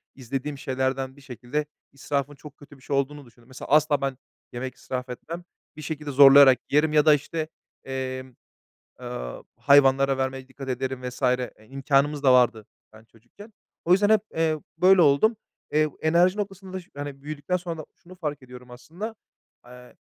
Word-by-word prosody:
izlediğim 135 Hz, +3 st, -5 dB
şeylerden 130 Hz, 0 st, -2 dB
bir 140 Hz, -, -17 dB
şekilde 135 Hz, +3 st, -4 dB, 0.3 s
israfın 140 Hz, 0 st, -3 dB
çok 145 Hz, +1 st, -14 dB
kötü 145 Hz, -1 st, -16 dB
bir -, -, -22 dB
şey 140 Hz, -, -3 dB
olduğunu 140 Hz, +1 st, -2 dB
düşündüm. 120 Hz, 0 st, -22 dB
Mesela, 130 Hz, 0 st, -10 dB
asla 150 Hz, -1 st, +3 dB
ben 135 Hz, -1 st, -2 dB, 0.4 s
yemek 125 Hz, +1 st, -5 dB
israf 125 Hz, 0 st, -6 dB
etmem. 165 Hz, +8 st, -7 dB, 0.3 s
Bir 155 Hz, -, -9 dB
şekilde 150 Hz, -1 st, -5 dB
zorlayarak 135 Hz, -1 st, +8 dB
yerim 150 Hz, +1 st, +3 dB
ya 150 Hz, 0 st, +4 dB
da 155 Hz, -, +7 dB
işte, 155 Hz, +2 st, -2 dB, 0.4 s
eee, 130 Hz, -1 st, -4 dB, 0.7 s
aaa, 120 Hz, -, -7 dB
hayvanlara 135 Hz, -1 st, +4 dB
vermeye 130 Hz, 0 st, -3 dB
dikkat 135 Hz, 0 st, -10 dB
ederim 130 Hz, 0 st, -3 dB
vs. 125 Hz, +2 st, -11 dB
E, 125 Hz, -4 st, -1 dB
imkânımız 140 Hz, +2 st, 0 dB
da 135 Hz, -2 st, +5 dB
vardı, 120 Hz, -4 st, +3 dB, 0.3 s
yani, 110 Hz, +1 st, -17 dB
çocukken. 120 Hz, -, -17 dB, 0.3 s
O 175 Hz, -, +3 dB
yüzden 200 Hz, +3 st, +4 dB
hep, 220 Hz, -2 st, +5 dB, 0.2 s
eee, 160 Hz, -1 st, +1 dB, 0.2 s
böyle 185 Hz, 0 st, +6 dB
oldum. 155 Hz, +10 st, +4 dB, 0.4 s
Eee, 155 Hz, 0 st, +3 dB
enerji 175 Hz, +4 st, +3 dB
noktasında 195 Hz, -2 st, -5 dB
şi 175 Hz, -, -21 dB
hani, 145 Hz, -1 st, -7 dB
büyüdükten 150 Hz, +4 st, -3 dB
sonra 170 Hz, -2 st, -6 dB
da 155 Hz, -, -7 dB
şunu 180 Hz, +2 st, -16 dB
fark 150 Hz, -5 st, -5 dB
ediyorum 125 Hz, -1 st, -13 dB
aslında. 175 Hz, -, -8 dB, 0.5 s
Eee, 125 Hz, 0 st, -15 dB
140 Hz, 165 wpm, -25 LUFS, 130-155 Hz, 0.7 s, zorlayarak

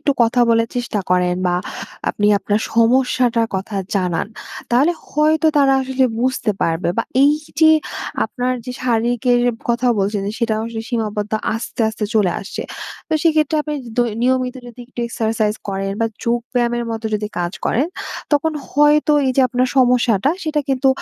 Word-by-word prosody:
একটু 290 Hz, -1 st, +2 dB
কথা 235 Hz, +2 st, +2 dB
বলার 230 Hz, 0 st, +3 dB
চেষ্টা 240 Hz, -4 st, -1 dB
করেন, 180 Hz, 0 st, +2 dB
বা 175 Hz, -, +1 dB, 0.6 s
আপনি 205 Hz, -, 0 dB
আপনার 205 Hz, +2 st, 0 dB
সমস্যাটার 240 Hz, 0 st, +3 dB
কথা 195 Hz, +2 st, -5 dB, 0.2 s
জানান, 180 Hz, -3 st, 0 dB, 0.4 s
তাহলে 270 Hz, +8 st, +4 dB, 0.2 s
হয়তো 310 Hz, +2 st, +2 dB
তারা 275 Hz, -1 st, +5 dB
আসলে 265 Hz, 0 st, +1 dB, 0.2 s
বুঝতে 255 Hz, -2 st, 0 dB
পারবে, 165 Hz, +2 st, 0 dB
বা -, -, +3 dB, 0.2 s
এই 285 Hz, +1 st, +6 dB, 0.3 s
যে 315 Hz, -, +7 dB, 0.5 s
আপনার 250 Hz, 0 st, -2 dB
যে 250 Hz, -, -5 dB
শারীরিকের 245 Hz, +1 st, +2 dB, 0.3 s
কথা 240 Hz, +1 st, +2 dB
বলছেন, 200 Hz, +1 st, 0 dB
যে -, -, -3 dB
সেটা 230 Hz, -2 st, +1 dB
আসলে 225 Hz, -1 st, -5 dB
সীমাবদ্ধ 215 Hz, -3 st, -2 dB, 0.2 s
আস্তে, 225 Hz, +1 st, -5 dB
আস্তে 220 Hz, -1 st, -3 dB
চলে 205 Hz, -5 st, +3 dB
আসছে। 195 Hz, -, -6 dB, 0.5 s
তো -, -, -3 dB
সেইক্ষেত্রে 310 Hz, -2 st, +2 dB
আপনি 300 Hz, 0 st, -4 dB, 0.2 s
দৈ 240 Hz, -2 st, +3 dB
নিয়মিত 255 Hz, 0 st, +1 dB
যদি 240 Hz, 0 st, -11 dB
একটু 245 Hz, -, -7 dB
এক্সারসাইজ 220 Hz, -2 st, 0 dB
করেন, 195 Hz, 0 st, -2 dB
বা 225 Hz, -, +3 dB, 0.2 s
যোগ 235 Hz, +1 st, +2 dB, 0.2 s
ব্যায়ামের 240 Hz, -1 st, +1 dB
মতো 225 Hz, 0 st, -5 dB
যদি 210 Hz, 0 st, -1 dB
কাজ 175 Hz, 0 st, -2 dB
করেন, 270 Hz, +7 st, +1 dB, 0.5 s
তখন 295 Hz, +2 st, +2 dB, 0.2 s
হয়তো 295 Hz, +1 st, +4 dB
এই 260 Hz, -, +2 dB
যে -, -, +5 dB
আপনার 250 Hz, +1 st, +1 dB
সমস্যাটা 245 Hz, -2 st, +3 dB
সেটা 310 Hz, -2 st, 0 dB
কিন্তু 270 Hz, 0 st, +2 dB
240 Hz, 165 wpm, -19 LUFS, 220-260 Hz, 0.6 s, যে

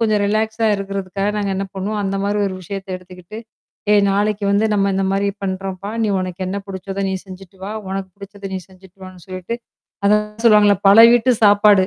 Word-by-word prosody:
கொஞ்சம் 215 Hz, -2 st, +2 dB
ரிலாக்ஸா 220 Hz, +2 st, 0 dB
இருக்கறதுக்காக 195 Hz, 0 st, -3 dB
நாங்க 205 Hz, -1 st, -1 dB
என்ன 195 Hz, -, -2 dB
பண்ணுவோம், 205 Hz, +2 st, -3 dB
அந்த 195 Hz, 0 st, -2 dB
மாதிரி 205 Hz, +1 st, 0 dB
ஒரு 190 Hz, -, -4 dB
விஷயத்தை 195 Hz, +1 st, -7 dB
எடுத்துக்கிட்டு, 180 Hz, +3 st, -12 dB, 0.5 s
ஏ 210 Hz, -, +6 dB
நாளைக்கு 205 Hz, +1 st, 0 dB
வந்து 205 Hz, +2 st, +3 dB
நம்ம 200 Hz, -1 st, +2 dB
இந்த 195 Hz, 0 st, 0 dB
மாதிரி 200 Hz, +1 st, +1 dB, 0.2 s
பண்றோம்பா. 190 Hz, +1 st, -4 dB
நீ 215 Hz, -, +1 dB
உனக்கு 185 Hz, 0 st, -5 dB
என்ன 195 Hz, +2 st, -3 dB
பிடிச்சதோ, 195 Hz, +1 st, -5 dB
நீ -, -, -2 dB
செஞ்சுட்டு 190 Hz, 0 st, -12 dB
வா. 200 Hz, -, -5 dB, 0.2 s
உனக்குப் 190 Hz, -1 st, -5 dB
பிடிச்சதை 200 Hz, 0 st, -9 dB
நீ 190 Hz, -, -2 dB
செஞ்சுட்டு 190 Hz, 0 st, -19 dB
வான்னு 185 Hz, -2 st, -12 dB
சொல்லிட்டு. 185 Hz, +4 st, -5 dB, 0.5 s
அதான் 210 Hz, +1 st, +4 dB, 0.2 s
சொல்லுவாங்கள்ல, 210 Hz, -3 st, +6 dB
பல 200 Hz, +2 st, +7 dB
வீட்டு 240 Hz, +1 st, +4 dB
சாப்பாடு. 205 Hz, -2 st, +5 dB
195 Hz, 180 wpm, -19 LUFS, 190-210 Hz, 0.5 s, பல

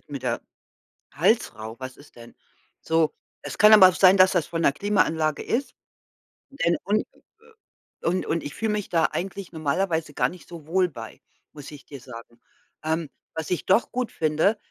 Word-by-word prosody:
wird -, -, -40 dB
mir 140 Hz, -, -4 dB
der 125 Hz, -2 st, -2 dB, 0.7 s
Hals -, -, +1 dB
rau, 110 Hz, +1 st, -8 dB
was 130 Hz, 0 st, -8 dB
ist 145 Hz, -, -19 dB
denn? 120 Hz, 0 st, -13 dB, 0.5 s
So, 160 Hz, -1 st, +1 dB, 0.3 s
es 145 Hz, -, -7 dB
kann 210 Hz, +1 st, +7 dB
aber 200 Hz, -4 st, +10 dB
auch 185 Hz, -, -1 dB
sein, 185 Hz, 0 st, +6 dB
dass 185 Hz, 0 st, +6 dB
das 175 Hz, -5 st, +1 dB
von 165 Hz, -1 st, -3 dB
der 140 Hz, -, +4 dB
Klimaanlage 160 Hz, -4 st, 0 dB
ist, 270 Hz, +4 st, -2 dB, 0.8 s
denn 170 Hz, -11 st, 0 dB
und 210 Hz, +2 st, +1 dB
äh, -, -, -27 dB, 0.9 s
und 180 Hz, +2 st, 0 dB
und 165 Hz, -, -2 dB
ich 145 Hz, -, -6 dB
fühle 220 Hz, -1 st, -1 dB
mich 210 Hz, -2 st, -3 dB
da 165 Hz, -2 st, +2 dB
eigentlich 195 Hz, 0 st, -5 dB
normalerweise 160 Hz, 0 st, -1 dB
gar -, -, +1 dB
nicht 180 Hz, -1 st, -13 dB
so 170 Hz, -4 st, -11 dB
wohl 180 Hz, +2 st, +2 dB
bei, 115 Hz, -7 st, -10 dB, 0.3 s
muss 145 Hz, -1 st, -10 dB
ich 145 Hz, -2 st, -12 dB
dir 140 Hz, -, -10 dB
sagen. 120 Hz, -1 st, -12 dB, 0.4 s
Ähm, 160 Hz, 0 st, -2 dB, 0.3 s
was 160 Hz, -2 st, -4 dB
ich 180 Hz, -, -1 dB
doch 190 Hz, +5 st, +2 dB
gut 250 Hz, -2 st, -2 dB
finde, 160 Hz, +7 st, +1 dB
165 Hz, 190 wpm, -24 LUFS, 145-190 Hz, 0.9 s, aber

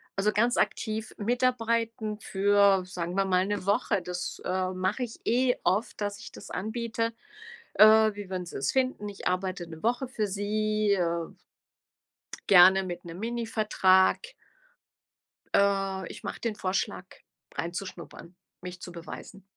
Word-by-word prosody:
Also, 205 Hz, +2 st, +2 dB
ganz 235 Hz, +4 st, +2 dB
aktiv 220 Hz, 0 st, -1 dB
mitarbeiten 230 Hz, -2 st, 0 dB
für, 200 Hz, -2 st, +3 dB
sagen 180 Hz, -1 st, -5 dB
wir 195 Hz, 0 st, +2 dB
mal, 185 Hz, -1 st, +2 dB
'ne 205 Hz, -2 st, -3 dB
Woche. 205 Hz, -1 st, +1 dB
Das, 180 Hz, 0 st, -5 dB
äh, 185 Hz, 0 st, -1 dB
mache 185 Hz, +7 st, -1 dB
ich 235 Hz, -2 st, -7 dB
eh 245 Hz, +2 st, +2 dB
oft, 195 Hz, +7 st, 0 dB
dass 205 Hz, 0 st, -3 dB
ich 230 Hz, -, -10 dB
das -, -, -11 dB
anbiete, 230 Hz, +3 st, -2 dB, 0.6 s
äh: 215 Hz, 0 st, +7 dB
„Wie 205 Hz, -2 st, -8 dB
würden 185 Hz, -1 st, -3 dB
Sie 175 Hz, -, -7 dB
es 135 Hz, +1 st, 0 dB
finden? 255 Hz, -5 st, 0 dB
Ich 200 Hz, -, -6 dB
arbeite 185 Hz, -1 st, -2 dB
'ne 160 Hz, -1 st, -11 dB
Woche 245 Hz, +3 st, 0 dB
für 220 Hz, -4 st, -2 dB
Sie, 215 Hz, +1 st, 0 dB
äh“ 170 Hz, -3 st, 0 dB, 1.2 s
„gerne 190 Hz, 0 st, +7 dB
mit 175 Hz, -1 st, -6 dB
'nem 170 Hz, +1 st, -9 dB
Minivertrag.“ 215 Hz, -5 st, +2 dB, 1.4 s
Äh, 195 Hz, -2 st, +1 dB
ich -, -, -11 dB
mache -, -, -5 dB
den 230 Hz, -3 st, -2 dB
Vorschlag 185 Hz, -1 st, -2 dB, 0.5 s
reinzuschnuppern, 175 Hz, 0 st, -6 dB, 0.3 s
mich 180 Hz, 0 st, -8 dB
zu 180 Hz, -, -8 dB
beweisen. 170 Hz, +3 st, -10 dB
200 Hz, 140 wpm, -28 LUFS, 185-220 Hz, 1.4 s, äh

